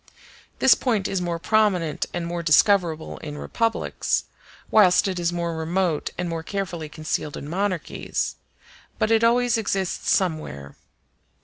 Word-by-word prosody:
This 265 - +6
point 220 -7 0
is 190 -2 -2
more 170 -1 -2
prominent 185 -4 +1
and 175 -1 -3
more 170 0 -3
discoverable 170 -1 +3
in 150 -1 -7
republics, 230 +8 -1 0.5
whilst 205 -1 +5
it 185 -2 -2
is 170 0 0
more 170 -1 -2
remote 165 0 -1
and 180 - -2
more 165 -1 -3
carefully 175 -3 -4
concealed 155 -1 -3
in 145 - -7
monarchies, 185 0 -2 0.6
but 215 - +1
it 225 0 +4
always 240 0 +3
exists 195 -4 -2
somewhere. 155 - -1
175 Hz, 135 wpm, -24 LUFS, 160-205 Hz, 0.6 s, This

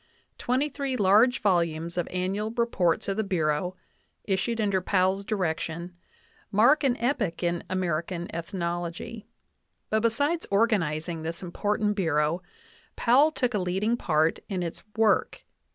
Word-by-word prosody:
Twenty 260 +4 +1
three 275 -2 -3
large 215 +5 +4
volumes 170 -4 +1
of 175 -1 -1
Annual 195 +4 -2
Reports 185 -8 +1
of 195 0 -1
the 220 - +1
Bureau, 180 -2 0 0.5
issued 205 +4 -1
under 200 -3 +1
Powell's 190 +1 +1
direction,, 175 -3 -3 0.6
mark 240 +10 +5
an 260 -2 +2
epoch 230 -9 -1
in 170 0 0
American 175 -1 -2
ethnology. 175 +4 -4 0.6
But 220 - +3
besides 285 +9 0
organizing 175 -7 +1
this 165 +3 -5
important 210 +3 -1
Bureau, 160 -2 +1 0.5
Powell 265 +6 +5
took 250 -5 -1
a 210 - +1
leading 190 +5 0
part 160 -7 +1
in 185 -3 -2
its 170 - -5
work. 220 -1 +2
190 Hz, 130 wpm, -27 LUFS, 170-225 Hz, 0.6 s, mark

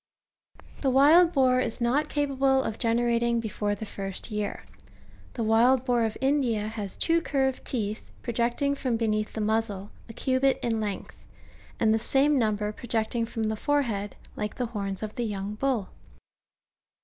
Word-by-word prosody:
The 270 - +2
wild 305 +7 +6
boar 255 -4 +3
is 235 -2 -2
not 245 +5 +1
capable 270 -2 +1
of 220 - -4
generating 235 0 +1
before 210 -2 -2
the 220 - -6
first 195 +1 -6
3'ear. 210 -1 -3 0.7
The 235 - -2
wild 240 +4 +4
boar 240 -3 +2
of 220 - -3
India^^ 245 -7 +1
has 210 -3 -5
two 335 0 +2
curved 265 -4 0
teeth, 215 -3 -3
project 235 +3 -1
ing 280 0 +2
from 255 -4 -1
beneath 215 -2 -1
the 220 - -3
muzzle, 210 -2 -1 0.2
a - - -8
cubit 260 +3 +1
in 225 -2 0
length; 205 -2 -5 0.6
and 220 -1 +4
the 225 - +2
same 275 +4 +3
number 210 -2 0
projecting 230 +1 -1
from 225 0 -3
the 220 0 0
forehead, 225 -6 -1 0.2
like 210 0 -4
the 250 - -1
horns 200 -4 -4
of 215 - -5
the 245 - -3
young 205 -2 -3
bull. 230 -3 -1
230 Hz, 160 wpm, -27 LUFS, 215-265 Hz, 0.7 s, wild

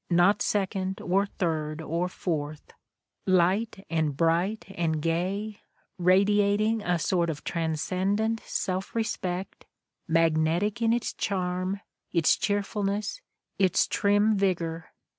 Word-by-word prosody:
not 175 +4 +4
second, 190 0 -1
or 195 -1 +1
third, 155 -5 -2
or 165 +3 -1
fourth 155 -5 -4 0.3
— - - -60 0.2
light 190 +3 +2
and 155 -4 -1
bright 170 +7 +1
and 160 -3 0
gay, 185 +7 -2 0.4
radiating 205 +4 +3
a 180 -3 +1
sort 170 +1 +1
of 150 -2 -5
transcendent 185 +7 -1
self 190 0 -3
respect, 190 -4 -3 0.4
magnetic 165 +6 +2
in 225 -1 +3
its 235 0 0
charm, 185 0 -2 0.3
its 170 -3 +4
cheerfulness, 205 - -1 0.4
its 190 -3 +4
trim 205 +1 +3
vigor. 170 -4 -1
185 Hz, 110 wpm, -27 LUFS, 165-205 Hz, 0.4 s, not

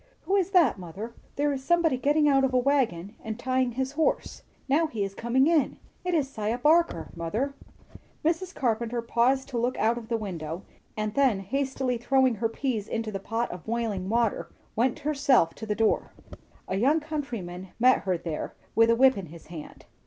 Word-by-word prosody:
"Who 390 - 0
is 385 -2 +2
that, 345 - +4
mother? 190 +7 -7 0.2
There 290 0 +1
is 265 -1 -5
somebody 340 -1 +3
getting 295 +4 +2
out 270 -1 +4
of 260 -1 +1
a - - +6
wagon 240 -8 +1
and 220 -1 -4
tying 255 0 0
his 265 +2 -2
horse; 310 +2 -1 0.3
now 310 +4 +3
he 220 -8 -3
is 195 0 -4
coming 235 +6 +2
in. 320 -2 +2 0.3
It 360 -1 0
is 295 -4 +2
'Siah 225 -3 -2
Barker, 330 +6 +3
mother." 210 +12 -2 0.7
Mrs. 340 +3 0
Carpenter 235 -1 -1
paused 245 +3 +2
to 245 -3 -2
look 245 +2 0
out 230 +2 +2
of 225 - -12
the 230 - +1
window, 175 -4 -5 0.3
and 215 0 -2
then 255 -8 +3
hastily 265 +2 -1
throwing 260 +1 +3
her 225 +1 -1
peas 225 -3 -2
into 225 -1 -3
the 195 - -4
pot 225 +4 -2
of 175 -3 -8
boiling 220 -5 -2
water, 230 -1 0 0.3
went 240 +4 +1
herself 280 - +2
to 220 - -8
the 210 - 0
door. 225 0 +1 0.5
A 190 - -1
young 280 +9 +3
countryman 235 - -5
met 255 +2 +5
her 185 -2 -1
there, 165 -2 -5 0.2
with 230 +1 +5
a 230 - +5
whip 260 -2 +5
in 185 - -7
his 165 +1 -13
hand. 155 -3 -10
240 Hz, 190 wpm, -27 LUFS, 215-275 Hz, 0.7 s, a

